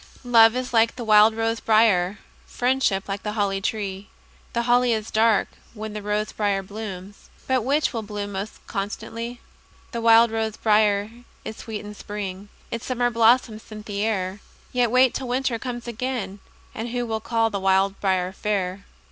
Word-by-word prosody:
Love 230 -2 +6
is 255 -1 -3
like 230 0 +3
the 250 - -6
wild 215 0 +6
rose 225 0 -1
briar; 210 -4 +3 0.3
Friendship 245 -6 0
like 195 0 -3
the 210 - -4
holly 200 -2 0
tree. 200 -2 -3 0.4
The 235 - 0
holly 245 0 +3
is 220 -1 -3
dark 220 -1 +3 0.3
when 215 0 -6
the 210 - -5
rose 210 +1 -1
briar 200 -2 0
blooms, 200 -1 -8 0.2
But 260 -3 +1
which 280 +4 +1
will 230 - -2
bloom 205 -1 -5
most 200 +2 -6
constantly? 230 +4 -5 0.5
The 235 - -3
wild 230 0 +6
rose 220 -1 -2
briar 210 -1 +2 0.3
is 220 - -6
sweet 220 -2 -6
in 210 - -8
spring, 205 -1 -6 0.2
Its 230 +1 -5
summer 245 -1 +1
blossoms 230 -1 +3
scent 215 -1 -11
the 205 -1 -3
air; 195 -3 -1 0.3
Yet 245 -2 +2
wait 255 +1 +4
till 265 - -4
winter 250 -1 -1
comes 240 -1 -6
again, 235 -4 -4 0.3
And 225 +2 -5
who 245 0 -2
will 220 -1 -2
call 225 0 +1
the 200 - -2
wild 195 +1 +2
briar 185 -2 +1
fair? 195 -1 -2
220 Hz, 175 wpm, -24 LUFS, 200-235 Hz, 0.5 s, Love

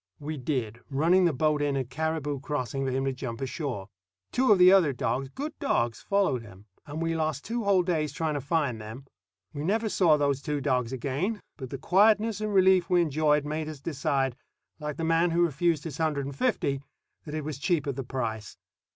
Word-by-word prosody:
We 150 +2 -4
did, 125 -5 -3
running 165 +7 +3
the 170 - +4
boat 150 +1 +1
in 145 -1 +1
at 130 -1 -3
Caribou 155 -1 -2
Crossing 135 -2 -3
for - - 0
him 135 +1 -1
to 135 - 0
jump 125 -3 -6
ashore. 135 - -4 0.4
Two 255 -2 +3
of 205 - +7
the 180 0 +8
other 180 -8 +5
dogs, 130 +2 -2
good 290 - -5
dogs, 120 - 0
followed 195 -11 +1
him; 100 -3 -14 0.2
and 155 +3 -4
we 165 0 0
lost 155 -3 -2
two 235 -1 -2
whole 195 -2 +4
days 160 -5 0
trying 155 +1 -2
to 145 - -2
find 140 -6 -1
them. 110 +5 -9 0.5
We 145 - -4
never 215 +6 +1
saw 170 -7 +4
those 140 -2 +1
two 150 -1 -2
dogs 125 -4 0
again; 140 - -2 0.2
but 130 -3 -7
the 135 - -5
quietness 210 - +3
and 215 0 -1
relief 190 -2 +4
we 180 -1 +4
enjoyed 150 -1 +2
made 155 +1 -3
us 155 -3 -8
decide, 135 -3 -1 0.4
like 150 -1 -4
the 165 - -3
man 165 +2 +3
who 170 +1 +2
refused 160 0 0
his 155 -3 -6
hundred 150 -4 0
and 140 0 -6
fifty, 140 - 0 0.4
that 150 -1 -6
it 155 - -3
was 145 -2 -5
cheap 160 -1 +1
at 140 -2 -2
the 135 - -4
price. 115 -4 -4
150 Hz, 210 wpm, -28 LUFS, 135-170 Hz, 0.5 s, the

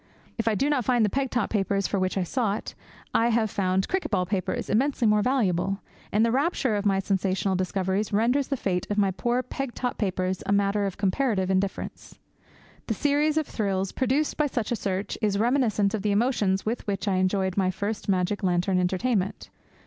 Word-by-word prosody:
If 230 - -1
I 220 - +3
do 270 +7 +1
not 290 -4 +1
find 240 -2 +3
the 210 - -1
peg 270 -1 0
top 240 -5 -1
papers 200 -2 0
for 200 - 0
which 185 +1 -1
I 190 - +1
sought, 215 +1 -2 0.4
I 230 - +3
have 225 -2 +1
found 190 -1 0
cricket 380 0 -1
ball 180 - +1
papers 190 0 -2
immensely 265 +2 +1
more 210 0 +4
valuable, 195 -6 +1 0.3
and 215 +2 +3
the 230 - +1
rapture 270 -3 +1
of 205 0 0
my 195 -1 +3
sensational 195 0 0
discoveries 190 +2 -1
renders 240 +6 +2
the 275 - -1
fate 180 -5 -1
of 205 - -1
my 200 -2 +3
poor 240 +6 0
peg 270 -2 -5
top 250 -1 -3
papers 185 -2 -1
a - - 0
matter 200 0 +2
of 195 - -6
comparative 200 -1 +1
indifference. 190 +1 -3 0.7
The - - -1
series 295 +1 +1
of 310 - +2
thrills 195 -5 -1
produced 270 +4 0
by 300 - +2
such 240 -5 -3
a - - +2
search 195 -2 -3
is 205 -2 +1
reminiscent 220 -4 +2
of 215 - -1
the 210 - 0
emotions 205 -3 +1
with 225 +1 -3
which 200 +1 -2
I 190 -2 +2
enjoyed 185 0 +1
my 190 -2 +2
first 205 +3 -3
magic 185 +1 +1
lantern 180 0 +1
entertainment. 190 +2 -1
205 Hz, 200 wpm, -26 LUFS, 190-240 Hz, 0.7 s, more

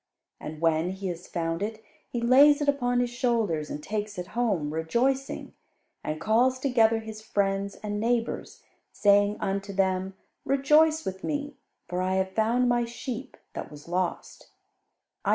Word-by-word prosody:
And 155 0 -7
when 165 +1 +2
he 190 0 -4
has 175 0 -6
found 165 0 -2
it, 220 +1 -4 0.3
he 240 - -3
lays 280 +5 +6
it 290 - -1
upon 245 -3 +2
his 245 -1 -1
shoulders 225 - 0
and 150 - -6
takes 210 +1 -3
it 180 0 -5
home, 200 -11 0
rejoicing; 245 +12 -1 0.5
and 155 0 -3
calls 240 +7 +3
together 235 -4 +3
his 220 -1 -8
friends 200 -2 -1
and 205 -1 -2
neighbours, 235 +1 -1 0.3
saying 205 0 +3
unto 195 +1 -2
them, 190 -1 0 0.3
'Rejoice 305 +4 +3
with 190 0 -5
me, 290 -1 -3 0.3
for 180 +1 -2
I 185 +1 0
have 190 0 0
found 230 +5 +2
my 240 0 +2
sheep 240 +2 -6 0.2
that - - -6
was 150 +1 -12
lost.' 180 0 -3
215 Hz, 155 wpm, -27 LUFS, 185-245 Hz, 0.5 s, lays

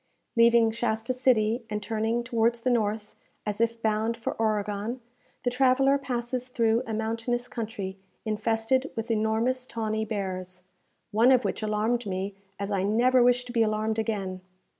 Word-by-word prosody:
Leaving 230 -1 +5
Shasta 225 +1 -1
City, 240 -2 +2
and 210 -1 -3
turning 225 +2 -1
towards 235 -1 +1
the 255 - +1
north, 215 -2 -1 0.3
as 210 +1 -2
if 230 0 +1
bound 220 +1 +1
for 230 - -3
Oregon, 210 +2 -1 0.4
the 245 - +1
traveller 270 +2 +3
passes 250 -1 -3
through 230 -2 +2
a 220 - -3
mountainous 230 +2 -2
country 205 -5 -5 0.3
infested 225 +5 0
with 225 +1 -3
enormous 225 +4 +1
tawny 220 -1 -2
bears, 185 -4 -4 0.5
one 230 +4 +5
of 255 -1 +4
which - - -2
alarmed 215 +2 0
me 190 +1 -3 0.2
as 200 +1 -4
I 195 -2 +1
never 240 +6 +3
wish 245 0 +4
to 245 - -7
be 230 - +2
alarmed 215 0 +1
again. 195 -4 -2
225 Hz, 155 wpm, -27 LUFS, 215-240 Hz, 0.5 s, Leaving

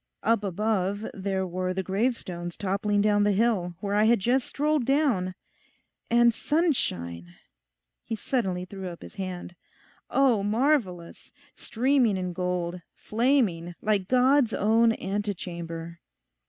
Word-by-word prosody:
Up 225 -2 +2
above 205 +1 -1
there 190 -1 -2
were 185 +1 -3
the 190 - -1
gravestones 190 -4 -2
toppling 205 +1 0
down 205 0 +3
the 205 - +3
hill, 195 -5 +1
where 200 -1 -2
I 210 +1 +4
had 235 0 +4
just 245 +6 +1
strolled 300 -1 0
down, 235 -10 +1 0.7
and 235 0 +5
sunshine!' 90 - -1 0.7
He 225 - -4
suddenly 190 -7 -2
threw 190 0 -7
up 170 - -10
his - - -11
hand. 185 -2 -6 0.5
'Oh, 260 -6 +3
marvellous! 210 - -1 0.2
streaming 245 -3 +1
in 180 -1 -3
gold—flaming, 180 +3 -1
like 205 -3 0
God's 255 0 +3
own 225 +2 +3
ante 205 0 -3
chamber. 170 -1 -7
205 Hz, 125 wpm, -27 LUFS, 180-235 Hz, 0.7 s, and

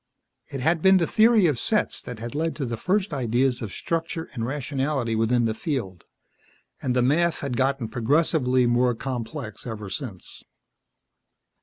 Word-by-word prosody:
It 135 - -4
had 160 +4 +2
been 190 +1 +6
the 170 - +2
theory 220 +1 +4
of 145 -8 +1
sets 215 -2 +1
that 125 - -8
had 115 +3 -6
led 160 +2 -1
to 140 - -3
the 120 -1 -3
first 185 - 0
ideas 125 0 +1
of 110 -4 -5
structure 165 - -3
and 120 -4 -4
rationality 135 -2 -1
within 115 +2 +2
the 110 - 0
field, 110 - -4 0.8
and 125 -1 -1
the 125 - +3
math 165 +6 +2
had 140 -3 -3
gotten 135 -1 0
progressively 130 +2 +2
more 120 0 +2
complex 125 0 -5
ever 105 -4 -6
since. 95 - -7
130 Hz, 160 wpm, -25 LUFS, 115-155 Hz, 0.8 s, been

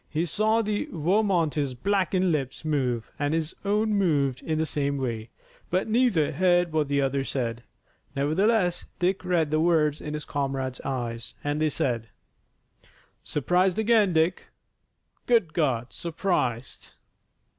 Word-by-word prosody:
He 160 +2 -1
saw 220 +7 +1
the 210 +8 -2
Vermonter's 165 - +1
blackened 185 +3 +1
lips 140 -1 -3
move, 130 -7 -1
and 145 +2 0
his 160 0 -2
own 210 +2 +1
moved 145 -10 +1
in 160 -1 -2
the 160 - +1
same 140 -2 -1
way, 115 -4 -3 0.4
but 185 +4 0
neither 220 - +2
heard 175 +1 +2
what 155 -2 +1
the 140 0 +1
other 135 0 0
said. 120 -4 -3 0.5
Nevertheless 175 +6 +1
Dick 185 +2 0
read 170 -4 +1
the 155 - +2
words 155 -3 +2
in 150 0 -4
his 150 - -5
comrade's 135 -2 -3
eyes, 120 -3 -4
and 145 +1 -1
they 155 - +3
said: 115 -6 -1 1.1
"Surprised 180 +5 +1
again, 220 -3 +3
Dick! 165 +2 +1 0.8
Good 225 -10 +3
God, 130 -7 0
surprised!" 155 -8 -2
155 Hz, 135 wpm, -26 LUFS, 140-185 Hz, 1.1 s, they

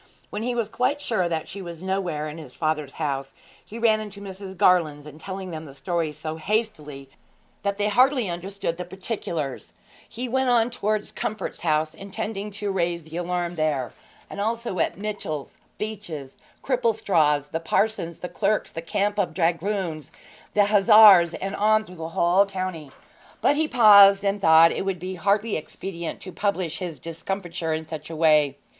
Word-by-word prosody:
When 210 - -4
he 245 +1 -1
was 230 -3 0
quite 255 +6 0
sure 215 -11 0
that 160 -2 -2
she 195 +4 -7
was 170 -1 -8
nowhere 180 -6 -2
in 155 +2 -7
his 140 -6 -12
father's 155 -3 -1
house, 135 -3 -3 0.3
he 225 - -10
ran 225 -2 +3
into 210 -2 -8
Mrs. 190 -1 -8
Garland's, 155 -6 +3
and 150 +1 -12
telling 190 0 -6
them 160 -1 -6
the 140 -2 -12
story 160 +3 -2
so 155 +1 -6
hastily 155 -8 -3 0.5
that 200 0 -1
they 205 - +1
hardly 250 +2 +3
understood 175 0 -4
the 180 - -4
particulars, 175 - -5 0.4
he 250 +2 -5
went 260 +1 +1
on 240 0 +3
towards 215 -3 -2
Comfort's 210 -3 -4
house, 155 -1 0
intending 205 +1 -5
to 205 0 -4
raise 170 -2 -1
the 160 +2 -8
alarm 175 0 -2
there, 150 -6 -1 0.3
and 200 - -6
also 230 -3 -2
at - - 0
Mitchell's, 200 -8 -5 0.2
Beach's, 195 -11 -6 0.3
Cripplestraw's, 195 - +1
the 165 - -1
parson's, 170 -1 -1
the 180 - -3
clerk's, 210 +3 -1
the 165 - -5
camp 205 +5 -1
of 175 -5 -1
dragoons, 170 -1 -1 0.4
of 205 -1 +5
hussars, 205 -4 +7
and 195 - -4
so - - -5
on 215 +1 +3
through 180 -2 -13
the 160 0 -5
whole 175 +4 +3
county. 185 -6 -5 0.5
But 290 - +3
he 310 +1 +1
paused, 200 -5 +7
and 200 0 0
thought 160 -1 +7
it - - -2
would 195 -1 -2
be 185 +2 -5
hardly 200 +4 +1
expedient 170 +2 -6
to 185 - -8
publish 185 -4 -2
his 175 -5 -5
discomfiture 170 -1 -4
in 160 0 -5
such 155 -1 -7
a 165 - -6
way. 150 -3 +3
185 Hz, 175 wpm, -24 LUFS, 160-210 Hz, 0.5 s, hussars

